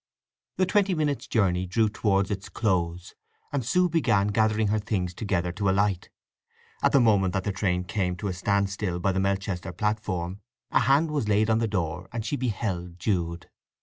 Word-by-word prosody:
The 185 Hz, -, +3 dB
twenty 195 Hz, -1 st, +2 dB
minutes' 150 Hz, -3 st, -1 dB
journey 95 Hz, -4 st, +1 dB
drew 110 Hz, +5 st, +2 dB
towards 100 Hz, -2 st, 0 dB
its 100 Hz, -1 st, -4 dB
close, 90 Hz, -5 st, -1 dB, 0.4 s
and 140 Hz, -3 st, 0 dB
Sue 180 Hz, +10 st, +2 dB
began 120 Hz, -, +2 dB
gathering 110 Hz, 0 st, +2 dB
her 110 Hz, +1 st, +1 dB
things 95 Hz, -4 st, -2 dB
together 90 Hz, -3 st, -1 dB
to 100 Hz, +2 st, -1 dB
alight. 95 Hz, -1 st, +1 dB, 0.7 s
At -, -, +3 dB
the 140 Hz, -, +6 dB
moment 100 Hz, -6 st, +3 dB
that 95 Hz, -, 0 dB
the 100 Hz, -, -1 dB
train 95 Hz, -2 st, 0 dB
came 90 Hz, -1 st, -1 dB
to 95 Hz, +4 st, -4 dB
a 95 Hz, -, -1 dB
stand 100 Hz, +2 st, 0 dB
still 95 Hz, -3 st, -2 dB
by 95 Hz, +2 st, +1 dB
the 95 Hz, -, -1 dB
Melchester 95 Hz, -1 st, -1 dB
platform 95 Hz, -1 st, -2 dB, 0.3 s
a -, -, +4 dB
hand 145 Hz, +4 st, +3 dB
was 140 Hz, -8 st, -1 dB
laid 105 Hz, +2 st, +3 dB
on 110 Hz, -, +3 dB
the 115 Hz, -, +1 dB
door 90 Hz, -3 st, -3 dB
and 115 Hz, -3 st, -4 dB
she 145 Hz, -, -1 dB
beheld 100 Hz, -8 st, -3 dB
Jude. 85 Hz, -3 st, -2 dB
100 Hz, 185 wpm, -26 LUFS, 90-110 Hz, 0.7 s, the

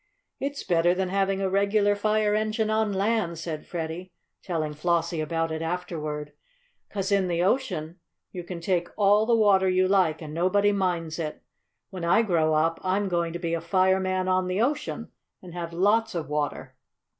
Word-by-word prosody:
"It's 280 Hz, +1 st, -3 dB
better 175 Hz, +1 st, +2 dB
than 190 Hz, 0 st, -1 dB
having 195 Hz, 0 st, 0 dB
a 190 Hz, -, 0 dB
regular 200 Hz, +1 st, +3 dB
fire 215 Hz, 0 st, +1 dB
engine 215 Hz, +1 st, 0 dB
on 215 Hz, -1 st, +1 dB
land," 200 Hz, -3 st, 0 dB
said 155 Hz, -2 st, -6 dB
Freddie, 170 Hz, +2 st, -5 dB, 0.3 s
telling 155 Hz, -5 st, -2 dB
Flossie 170 Hz, +1 st, 0 dB
about 165 Hz, +1 st, -1 dB
it 160 Hz, 0 st, -3 dB
afterward, 155 Hz, -4 st, -4 dB, 0.6 s
"'cause 195 Hz, -1 st, -3 dB
in 195 Hz, -2 st, +3 dB
the 175 Hz, 0 st, 0 dB
ocean 185 Hz, -, -1 dB, 0.3 s
you 180 Hz, -, -6 dB
can 175 Hz, 0 st, -7 dB
take 175 Hz, 0 st, 0 dB
all 210 Hz, +1 st, +4 dB
the 235 Hz, -, +4 dB
water 200 Hz, -4 st, +4 dB
you 185 Hz, 0 st, +3 dB
like 185 Hz, -5 st, +2 dB
and 155 Hz, -2 st, -8 dB
nobody 195 Hz, +5 st, +2 dB
minds 175 Hz, -5 st, -1 dB
it. 155 Hz, -2 st, -5 dB, 0.5 s
When 185 Hz, -3 st, -6 dB
I 170 Hz, +7 st, +4 dB
grow 160 Hz, -6 st, +2 dB
up 165 Hz, +2 st, +1 dB
I'm 195 Hz, +2 st, 0 dB
going 170 Hz, -1 st, 0 dB
to -, -, -3 dB
be 170 Hz, -1 st, -2 dB
a 165 Hz, -, -1 dB
fireman 185 Hz, +1 st, +1 dB
on 185 Hz, 0 st, +1 dB
the 185 Hz, +2 st, -1 dB
ocean, 275 Hz, +6 st, -1 dB, 0.3 s
and 180 Hz, -2 st, -12 dB
have 170 Hz, -1 st, -5 dB
lots 205 Hz, +5 st, +2 dB
of 160 Hz, -4 st, -3 dB
water." 150 Hz, 0 st, -3 dB
185 Hz, 180 wpm, -26 LUFS, 165-200 Hz, 0.6 s, all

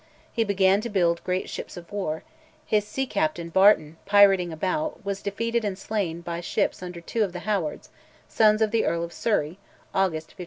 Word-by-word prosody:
He 230 Hz, -, +2 dB
began 195 Hz, -1 st, +3 dB
to 235 Hz, -, -4 dB
build 170 Hz, -5 st, +1 dB
great 185 Hz, 0 st, -1 dB
ships -, -, -7 dB
of 175 Hz, +2 st, -11 dB
war; 160 Hz, -6 st, -3 dB, 0.4 s
his 210 Hz, -1 st, +1 dB
sea 265 Hz, +6 st, -2 dB
captain, 170 Hz, -7 st, -1 dB
Barton, 170 Hz, -4 st, +4 dB
pirating 195 Hz, -3 st, +5 dB
about, 200 Hz, -, -2 dB
was 200 Hz, 0 st, -3 dB
defeated 230 Hz, +3 st, -1 dB
and 200 Hz, -3 st, -2 dB
slain 195 Hz, -5 st, -3 dB
by 170 Hz, 0 st, -4 dB
ships 175 Hz, -, -1 dB
under 180 Hz, -1 st, -7 dB
two 220 Hz, +6 st, -1 dB
of 190 Hz, -4 st, -3 dB
the 180 Hz, -, -6 dB
Howards, 195 Hz, -8 st, -2 dB, 0.4 s
sons 215 Hz, 0 st, +4 dB
of 215 Hz, -, 0 dB
the 225 Hz, 0 st, +2 dB
Earl 170 Hz, 0 st, 0 dB
of 170 Hz, 0 st, -6 dB
Surrey 185 Hz, -5 st, -1 dB, 0.3 s
(August 170 Hz, -5 st, 0 dB
1511). -, -, -19 dB
195 Hz, 190 wpm, -25 LUFS, 170-210 Hz, 0.4 s, pirating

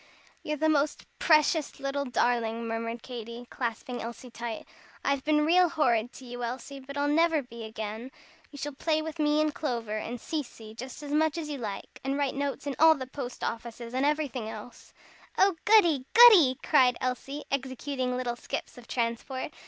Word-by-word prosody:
"You're 300 Hz, 0 st, -3 dB
the 315 Hz, +2 st, +2 dB
most 300 Hz, -1 st, +1 dB
precious 310 Hz, -2 st, +3 dB
little 275 Hz, +1 st, -2 dB
darling," 235 Hz, -2 st, 0 dB
murmured 230 Hz, +1 st, -3 dB
Katy, 235 Hz, -1 st, -7 dB
clasping 245 Hz, 0 st, -4 dB
Elsie 235 Hz, +2 st, -7 dB
tight. 230 Hz, -1 st, -5 dB, 0.4 s
"I've 280 Hz, -1 st, +1 dB
been 300 Hz, 0 st, +3 dB
real 355 Hz, +2 st, +5 dB
horrid 245 Hz, -8 st, +1 dB
to 260 Hz, -, -11 dB
you, 245 Hz, 0 st, -6 dB
Elsie. 260 Hz, +3 st, -5 dB
But 280 Hz, +1 st, -9 dB
I'll 285 Hz, 0 st, +1 dB
never 320 Hz, 0 st, +3 dB
be 235 Hz, -2 st, -9 dB
again. 220 Hz, +2 st, -6 dB, 0.4 s
You 285 Hz, -, -12 dB
shall 290 Hz, +1 st, -4 dB
play 310 Hz, +2 st, 0 dB
with 320 Hz, 0 st, -6 dB
me 300 Hz, 0 st, +3 dB
and 305 Hz, -1 st, +1 dB
Clover, 230 Hz, -8 st, -2 dB
and 240 Hz, +3 st, -5 dB
Cecy, 240 Hz, -9 st, -5 dB
just 255 Hz, +5 st, -8 dB
as 290 Hz, -, -6 dB
much 315 Hz, +1 st, +2 dB
as 315 Hz, -2 st, -4 dB
you 285 Hz, -2 st, -4 dB
like, 210 Hz, -4 st, -6 dB
and 270 Hz, +1 st, -1 dB
write 285 Hz, -2 st, 0 dB
notes 280 Hz, +1 st, -3 dB
in 280 Hz, -2 st, -2 dB
all 320 Hz, +1 st, +8 dB
the 265 Hz, -3 st, -5 dB
post 255 Hz, -1 st, -7 dB
offices, 235 Hz, +1 st, -5 dB
and 260 Hz, +1 st, 0 dB
everything 285 Hz, -6 st, 0 dB
else." 220 Hz, +2 st, -10 dB, 0.5 s
"Oh, 385 Hz, -1 st, +4 dB
goody! 345 Hz, -11 st, +5 dB
goody!" 395 Hz, -, +9 dB
cried 255 Hz, -5 st, +4 dB
Elsie, 270 Hz, +3 st, -3 dB
executing 260 Hz, -1 st, -2 dB
little 245 Hz, -1 st, -2 dB
skips 245 Hz, -, -6 dB
of 235 Hz, -, -15 dB
transport. 235 Hz, +2 st, -2 dB
265 Hz, 180 wpm, -28 LUFS, 235-300 Hz, 0.5 s, goody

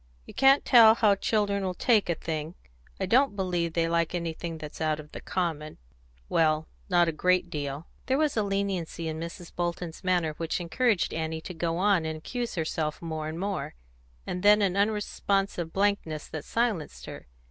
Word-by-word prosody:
"You -, -, -12 dB
can't 270 Hz, +1 st, +5 dB
tell 225 Hz, -3 st, +8 dB
how 215 Hz, -3 st, +4 dB
children 200 Hz, 0 st, 0 dB
will 185 Hz, -1 st, -2 dB
take 215 Hz, -2 st, +2 dB
a 170 Hz, -, +2 dB
thing. 160 Hz, +1 st, -4 dB, 0.4 s
I 190 Hz, -, 0 dB
don't 250 Hz, +3 st, +3 dB
believe 175 Hz, -4 st, -1 dB
they 165 Hz, 0 st, +1 dB
like 170 Hz, 0 st, 0 dB
anything 165 Hz, -1 st, -4 dB
that's 155 Hz, 0 st, -9 dB
out 155 Hz, -1 st, 0 dB
of 150 Hz, 0 st, -11 dB
the -, -, -8 dB
common 160 Hz, -4 st, -3 dB, 0.5 s
well, 155 Hz, -, +2 dB, 0.2 s
not 175 Hz, -2 st, +4 dB
a -, -, +1 dB
great 180 Hz, +2 st, +1 dB
deal." 145 Hz, 0 st, -4 dB, 0.2 s
There 265 Hz, 0 st, +2 dB
was 305 Hz, -1 st, +1 dB
a 220 Hz, -, +2 dB
leniency 195 Hz, -5 st, -2 dB
in 160 Hz, 0 st, -4 dB
Mrs. 170 Hz, +1 st, -8 dB
Bolton's 175 Hz, 0 st, -3 dB
manner 175 Hz, -4 st, +1 dB
which 165 Hz, +1 st, -2 dB
encouraged 210 Hz, +4 st, +1 dB
Annie 160 Hz, 0 st, -2 dB
to 180 Hz, -, -7 dB
go 165 Hz, 0 st, -2 dB
on 195 Hz, -2 st, +3 dB
and 160 Hz, 0 st, -3 dB
accuse 240 Hz, +9 st, -4 dB
herself 155 Hz, -2 st, -2 dB
more 160 Hz, -2 st, -4 dB
and 160 Hz, +2 st, -5 dB
more, 200 Hz, -, -3 dB, 0.5 s
and 180 Hz, -, -4 dB
then 210 Hz, +1 st, +6 dB
an 190 Hz, -2 st, +1 dB
unresponsive 200 Hz, -4 st, 0 dB
blankness 195 Hz, -6 st, 0 dB
that 155 Hz, -, -6 dB
silenced 185 Hz, -, -1 dB
her. -, -, -9 dB
175 Hz, 180 wpm, -28 LUFS, 160-200 Hz, 0.5 s, tell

